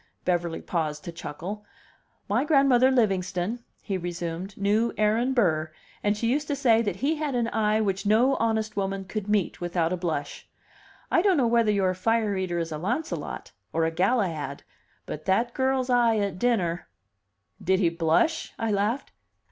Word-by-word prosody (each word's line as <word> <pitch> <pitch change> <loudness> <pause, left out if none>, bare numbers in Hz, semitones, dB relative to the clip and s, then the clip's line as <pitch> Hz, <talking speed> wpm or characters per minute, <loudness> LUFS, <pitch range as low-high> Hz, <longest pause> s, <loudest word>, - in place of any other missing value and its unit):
Beverly 175 -2 0
paused 155 -3 -2
to 170 - -6
chuckle. 170 +6 -6 0.6
"My 225 +6 +1
grandmother 275 -4 +4
Livingston," 195 -2 0 0.2
he 195 -3 -2
resumed, 175 +2 -5
"knew 210 +4 +2
Aaron 220 +4 +2
Burr, 160 -9 +2 0.3
and 205 0 +1
she 230 - -2
used 285 +5 0
to 290 - -1
say 235 -5 +4
that 205 -6 -1
he 285 +10 0
had 295 -4 -2
an 235 -1 0
eye 215 -1 +1
which 195 -2 -1
no 225 +6 +4
honest 220 -1 0
woman 195 -1 -2
could 210 +1 -5
meet 205 -5 0
without 175 -1 0
a - - -1
blush. 160 -5 -4 0.6
I - - +4
don't 380 -2 +3
know 260 - +3
whether 230 -2 +3
your 190 -3 +2
fire 220 +2 +1
eater 185 -2 -2
is 165 -1 -2
a 155 - -4
Launcelot, 245 - -3 0.2
or 165 0 +2
a 165 - 0
Galahad, 170 - 0 0.4
but 150 - -7
that 230 +6 +1
girl's 260 -1 0
eye 235 -2 +4
at 200 -3 -2
dinner 185 -8 0 0.4
" 100 0 -24
"Did 190 +1 +2
he 175 -4 +3
blush?" 170 - +1
I 225 -1 -1
laughed. 210 +7 -1
205 Hz, 170 wpm, -26 LUFS, 175-235 Hz, 0.6 s, grandmother